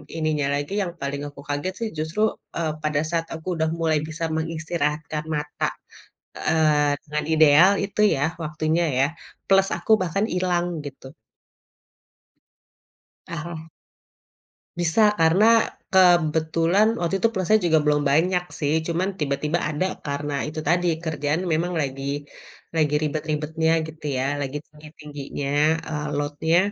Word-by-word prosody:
ininya 155 -3 0
lagi, 145 +7 -3
yang 175 -3 -3
paling 140 +1 -3
aku 145 -1 -13
kaget 145 +6 -2
sih 230 -1 -2
justru, 160 +7 -2 0.4
eee, 165 -2 0 0.2
pada 150 -1 +1
saat 165 -1 0
aku 160 +3 -11
udah 160 0 +1
mulai 160 -2 +2
bisa 160 +1 -4
mengistirahat 160 -1 -2
kan 150 0 -3
mata, 150 0 -2 0.7
eee, 150 -2 +2
dengan 150 0 -3
ideal 155 +4 +7
itu 200 +1 -6 0.2
ya 140 0 +1 0.2
waktunya 155 +2 0 0.2
ya, 135 - +5 0.4
plus 195 0 +4
aku - - -3
bahkan 185 +3 0
hilang 180 -1 +1 0.2
gitu. 135 0 -10 2.1
Ah - - -8
hah. 165 -2 -6 1.2
Bisa 175 +4 +2 0.2
karena 165 +6 +4 0.5
kebetulan 170 +1 +4
waktu 175 +3 0
itu 230 - +4
plusnya 200 +4 +3
juga 160 -2 +4
belum 150 0 +2
banyak 180 +4 +2 0.2
sih, 145 0 +1
cuman 175 +3 0
tiba-tiba 150 +3 0
ada 155 +5 -1 0.2
karena 145 0 -3
itu 155 +1 -5
tadi 175 +2 +2 0.2
kerjaan 155 0 -1
memang 175 +3 0
lagi 135 -1 -4 0.7
lagi 150 -2 +2
ribet-ribetnya 155 +1 -1 0.2
gitu 155 -1 -11
ya, 130 - 0 0.2
lagi 140 +1 -3
tinggi-tingginya, 150 -2 -7 0.4
eee, 150 -1 -3
load-nya, 145 +3 0
155 Hz, 130 wpm, -24 LUFS, 150-170 Hz, 2.1 s, ideal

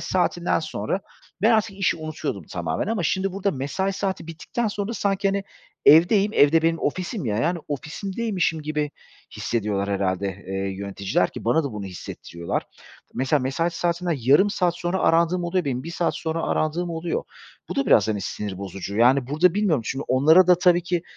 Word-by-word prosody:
saatinden 180 -1 0
sonra 155 - -3 0.4
ben 220 - +5
artık 215 -3 +2
işi 190 -3 +1
unutuyordum 155 - -5
tamamen 85 - -2
ama 215 -3 -1
şimdi 190 +4 0
burada 200 +1 0
mesai 175 +7 -2
saati 190 -3 -3
bittikten 165 +8 -3
sonra 205 +1 -3
sanki, 200 -3 0
hani, 195 0 -1 0.4
evdeyim, 195 +7 +6
ev 145 +1 +5
de 165 0 +4
benim 165 0 +2
ofisim 185 - -3
ya, 105 -3 -1
yani, 170 +9 0
ofisimdeymişim 180 - -2
gibi 150 -1 -2 0.5
hissediyorlar 105 -3 -1
herhâlde, 100 -1 0 0.2
eee, 95 - -5 0.2
yöneticiler 100 -2 -1
ki - - -9
bana 150 +8 +2
da 140 - -4
bunu 105 -2 -5
hissettiriyorlar. 85 -2 -5 0.5
Mesela, 135 +3 +1
mesai 135 +7 0
saatimden 170 0 -1
yarım 140 - +4
saat 180 -3 +1
sonra 175 +2 -1
arandığım 170 +1 +2
oluyor 175 +1 0
benim, 130 -3 -2
1 165 - -6
saat 170 0 -1
sonra 160 0 -2
arandığım 170 +3 -1
oluyor. 165 0 -2 0.5
Bu - - -5
da 275 - +1
biraz, - - +5
hani, 105 -2 -1
sinir 95 0 -5
bozucu, 100 +1 -6
yani, 125 +3 +4
burada 160 +6 +3
bilmiyorum, 195 - +1
çünkü 135 +4 -3
onlara 155 +8 +6
da 180 -1 +5
tabii 175 -1 +4
ki 175 -1 -1
165 Hz, 175 wpm, -24 LUFS, 130-185 Hz, 0.5 s, evdeyim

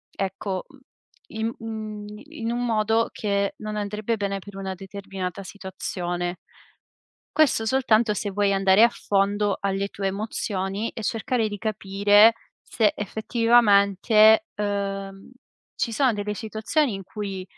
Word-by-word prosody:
ecco, 195 0 -3
uhm, - - -25 0.2
im 220 +1 -3
un 215 -2 -6 0.2
in 235 -8 -4
un 245 +1 -1
modo 225 0 +1
che 200 -1 -1
non 215 0 -5
andrebbe 210 +2 -2
bene 200 -1 -2
per 200 +1 -12
una 190 -1 -4
determinata 195 0 -6
situazione. 180 -2 -4 1.0
Questo 280 -7 +3
soltanto 230 -3 +3
se 205 0 -3
vuoi 200 0 +1
andare 195 +2 +5
a - - +6
fondo 205 -2 0
alle 195 0 -1
tue 200 -1 -4
emozioni 200 0 -2
e 225 - -8
cercare 225 +1 0
di 205 -1 -6
capire 205 +1 +4 0.3
se 215 -3 +1
effettivamente, 215 - +4
uhm, 195 0 -4 0.4
ci - - -1
sono 255 +1 +2
delle 210 0 -3
situazioni 220 +5 -1
in 195 - -6
cui 195 -1 -6
205 Hz, 130 wpm, -24 LUFS, 195-220 Hz, 1.0 s, a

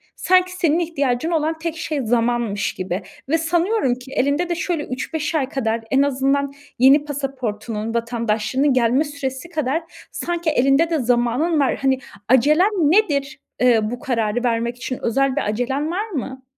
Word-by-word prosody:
sanki 365 0 +3
senin 335 -3 +2
ihtiyacın 300 -3 -1
olan 320 0 0
tek 330 0 -4
şey 310 -3 -2
zamanmış 235 -3 0
gibi 185 +1 -3 0.3
ve 325 - +3
sanıyorum 335 - +1
ki 255 +1 -13
elinde 285 +7 0
de 345 - 0
şöyle 335 -2 -2
3-5 295 +5 -3
ay 275 -3 0
kadar 230 -4 -1
en 270 - +4
azından 280 0 +1 0.3
yeni 275 +4 +6
pasaportunun, 235 -6 -4
vatandaşlığının 235 +3 0
gelme 250 +3 +3
süresi 285 +1 -5
kadar 310 0 -1 0.3
sanki 345 -2 -2
elinde 275 +3 +3
de 320 -3 0
zamanın 245 +7 +1
var. 270 -3 +2
Hani, 265 -1 +2 0.3
acelen 300 - +4
nedir? 300 -5 +2 0.2
Eee, 245 -3 +5
bu 245 - -5
kararı 235 -2 -1
vermek 235 0 0
için 255 0 -5
özel 270 +3 +1
bir - - +1
acelen 265 +8 -1
var 415 +5 -2
mı? 265 - -5
275 Hz, 155 wpm, -21 LUFS, 245-320 Hz, 0.3 s, yeni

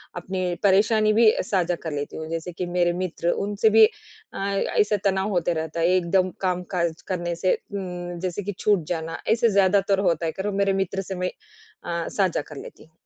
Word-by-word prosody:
अपनी 180 0 -3
परेशानी 215 +2 +4
भी 220 0 +6
साझा 180 -2 0
कर 160 - -3
लेती 145 -1 -4
हूँ 160 - -5
जैसे 165 +2 -4
कि 180 +1 -4
मेरे 175 0 +1
मित्र 170 -1 -2 0.2
उनसे 205 +2 +2
भी 220 0 +8
अ, - - -10
ऐसे 200 +1 +1
तनाव 190 +1 +1
होता 175 -3 0
रहता 160 0 -3
है 165 - +3
एकदम 185 +2 +1
काम-काज 180 -3 -1
करने 175 -2 -2
से 185 +2 +1 0.2
उम, 180 -3 -5
जैसे 185 +2 -3
कि 205 - -3
छूट 205 -5 +2
जाना 165 -1 -3
ऐसे 230 0 +3
ज़्यादातर 195 0 +3
होता 170 0 -1
है 160 - 0
करो 195 +4 -3
मेरे 195 0 +1
मित्र 195 0 -1
से 190 0 -6
मैं 180 0 -1 0.5
अ, 170 -1 -3
साझा 190 -6 0
कर 150 - -9
लेती - - -10
हूँ। 160 - -23
185 Hz, 195 wpm, -24 LUFS, 170-200 Hz, 0.5 s, भी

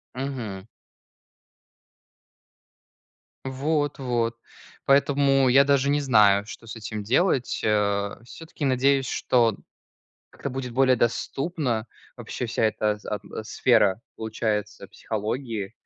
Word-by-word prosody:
Мгм. 120 -8 -5 2.8
Вот, 145 +2 -1
вот. 120 -3 -1 0.5
Поэтому 140 -1 +3
я 135 +2 +6
даже 140 0 +2
не 145 +1 +2
знаю, 105 -6 +4
что 110 +2 -11
с 115 - -7
этим 110 -1 -6
делать, 130 - +1
э. 100 -1 +1
Всё-таки 160 +3 -7
надеюсь, 135 0 +2
что 115 -4 +2 0.7
как-то 140 - -6
будет 125 -2 -5
более 130 0 +4
доступно 125 0 -1 0.3
вообще 125 - -5
вся 115 -1 -2
эта 105 -1 +1
ат 105 - -3 0.3
сфера, 110 -5 +3
получается, 110 -1 -3
психологии. 110 -1 -4
125 Hz, 100 wpm, -25 LUFS, 110-135 Hz, 2.8 s, я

